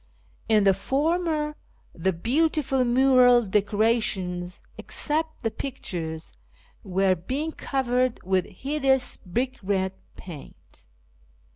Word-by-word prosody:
In 215 -2 +5
the 195 -1 +5
former, 305 - 0 0.4
tlie 170 0 -2
beautiful 275 0 +2
mural 250 -1 +5
decorations 200 -3 0 0.2
(except 315 -1 -2
the 225 - 0
pictures) 170 - -6 0.5
were 190 -1 +2
being 265 - -3
covered 255 -4 0
with 185 -1 +1
hideous 265 +3 0
brick 245 +8 -3
red 190 -1 0 0.2
paint. 160 -7 -12
240 Hz, 95 wpm, -25 LUFS, 190-270 Hz, 0.5 s, In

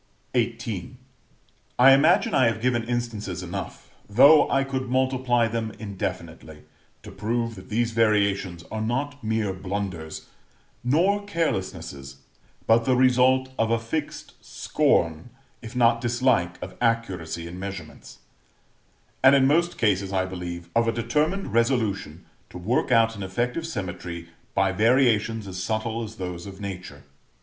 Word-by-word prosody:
XVIII. 115 -1 -2 0.8
I 130 +2 +8
imagine 140 +5 +4
I 130 - +4
have 115 - -1
given 120 0 +1
instances 115 -6 -3
enough, - - -7 0.2
though 140 +8 +7
I 135 0 +2
could 130 -2 -4
multiply 130 -2 +1
them 115 -1 -3
indefinitely, 95 -6 -6 0.4
to - - -10
prove 115 +3 -2
that 95 -3 -12
these 115 +2 0
variations 100 -6 +1
are 110 - -3
not 140 +5 -2
mere 110 -3 -1
blunders, 95 -4 -5 0.6
nor 180 +11 +2
carelessnesses, 95 - -3 0.5
but 115 +1 +4
the 130 - +3
result 130 +1 +4
of 115 - +2
a 115 - +2
fixed 130 +7 -5
scorn, 80 +6 0 0.3
if 115 +1 -10
not 115 -1 +3
dislike, 120 -8 +1
of 95 - -7
accuracy 95 -9 -1
in 85 +2 -8
measurements; 100 +1 -8 1.1
and, 135 +1 +8
in 135 -1 +4
most 170 +5 +2
cases, 100 -3 +1
I 95 -1 +1
believe, 90 -2 -6
of 115 0 +3
a - - +3
determined 150 - -1
resolution 110 - 0 0.2
to - - -9
work 110 +9 0
out 115 -1 +4
an 100 - -8
effective 120 - -2
symmetry 90 - -6 0.3
by 95 0 +2
variations 115 0 +2
as 95 -1 -5
subtle 110 +3 -2
as 110 0 -8
those 90 -2 -6
of 95 0 -10
Nature. 90 -8 -7
115 Hz, 140 wpm, -25 LUFS, 95-125 Hz, 1.1 s, I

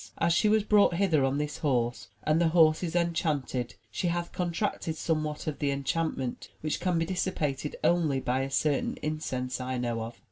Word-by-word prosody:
As 170 0 +2
she 210 +5 +3
was 215 0 +4
brought 205 -4 +4
hither 170 -6 +3
on 135 +1 +1
this 150 0 -3
horse 125 -5 0 0.2
and 155 +2 +2
the 170 - +4
horse 160 -1 +5
is 175 -2 -3
enchanted 155 -8 0 0.2
she 180 - -1
hath 170 0 -1
contracted 175 -2 -2
somewhat 155 -2 -2
of 155 -2 -3
the 145 - +1
enchantment, 140 -2 -2
which 155 0 -1
can 180 -2 +1
be 165 - +1
dissipated 155 -6 -2
only 160 -6 +3
by 130 0 0
a 135 - -2
certain 145 +1 0
incense 130 -5 -2
I 130 0 -2
know 120 -2 -1
of. 115 +1 -6
155 Hz, 185 wpm, -29 LUFS, 135-170 Hz, 0.2 s, horse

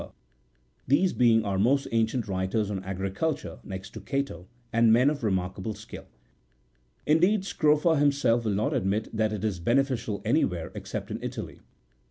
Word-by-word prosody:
held - - -9
by - - -28
Scrofa, 60 0 -40
these 180 +8 +3
being 115 -2 +4
our 100 -1 -1
most 135 +7 +2
ancient 115 0 0
writers 95 +2 -1
on 95 -2 -4
agri 95 +1 -3
culture 160 +11 -3
next 95 +1 -7
to - - -9
Cato, 135 - -3 0.3
and 115 0 +5
men 125 +5 +5
of 145 -4 -5
remarkable 95 +1 -2
skill. - - -11 1.0
Indeed, 180 +7 +3
Scrofa 155 -2 +2
himself 140 -5 +2
will 110 - +1
not 105 +2 0
admit 100 +4 -1
that 110 0 +1
it 105 -2 -4
is 105 -5 -1
beneficial 120 0 0
anywhere 95 - 0
except - - -6
in - - -4
Italy. - - -6
110 Hz, 170 wpm, -27 LUFS, 95-140 Hz, 1.0 s, and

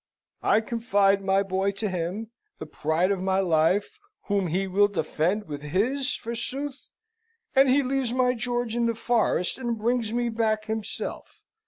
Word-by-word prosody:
I 220 - +3
confide 205 -4 +2
my 195 +1 +2
boy 195 +1 0
to 210 +2 -2
him, 185 +5 -3 0.3
the - - -7
pride 160 +5 0
of 195 -2 -1
my 190 0 +1
life, 185 - +1 0.2
whom 200 -3 0
he 185 +4 0
will 195 +2 +3
defend 180 +1 -1
with 145 -2 -6
his, 235 - 0
forsooth! 265 +5 -4 0.6
And 270 0 +6
he 280 +2 +4
leaves 265 -2 -1
my 250 0 +2
George 240 -1 -2
in 235 -1 +1
the 230 - 0
forest, 225 -4 +1
and 240 -3 -2
brings 230 0 0
me 240 0 0
back 220 -1 0
himself! 220 -1 -5
215 Hz, 160 wpm, -26 LUFS, 190-240 Hz, 0.6 s, And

